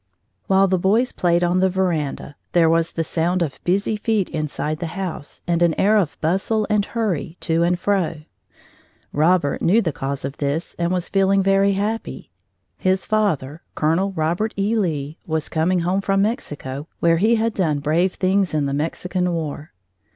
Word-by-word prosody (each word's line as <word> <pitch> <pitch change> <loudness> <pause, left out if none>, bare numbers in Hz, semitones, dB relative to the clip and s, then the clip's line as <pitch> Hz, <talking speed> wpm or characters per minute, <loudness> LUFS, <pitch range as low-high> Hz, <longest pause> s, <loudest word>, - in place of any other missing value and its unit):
While 195 0 +4
the 185 -1 +1
boys 220 +8 +2
played 175 -1 +1
on 175 +1 +2
the 190 0 +3
veranda, 165 -6 -2 0.2
there 170 -2 +5
was 165 0 +1
the 165 - -1
sound 170 +3 0
of 140 -5 -6
busy 200 +4 +1
feet 210 -2 0
inside 155 -1 -3
the 170 0 -5
house, 180 -7 -6
and 170 -1 0
an 170 -2 +2
air 210 +3 +4
of 165 -9 0
bustle 195 +6 +1
and 210 -1 +3
hurrying 200 -8 -2
to 165 0 +1
and 175 +1 +2
fro. 180 -6 0 0.9
Robert 155 -1 +2
knew 195 +7 +4
the 180 -8 0
cause 135 0 -4
of 135 +1 -6
this 145 +4 -2
and 170 0 +1
was 180 -1 -1
feeling 195 0 +2
very 195 +1 +3
happy. 210 +3 -3 0.5
His 185 0 +1
father, 165 -9 0
Colonel 165 +6 +1
Robert 175 +6 -1
E. 205 +3 +1
Lee, 155 -7 -2
was 160 -1 -2
coming 175 +3 +1
home 185 +3 0
from 195 0 +1
Mexico, 145 - -4
where 165 0 +3
he 220 +6 +3
had 225 0 0
done 160 -7 0
brave 160 +6 +1
things 190 -3 +1
in 150 -2 +1
the 140 - -2
Mexican 180 +4 -1
War. 155 -2 -4
175 Hz, 175 wpm, -21 LUFS, 160-195 Hz, 0.9 s, there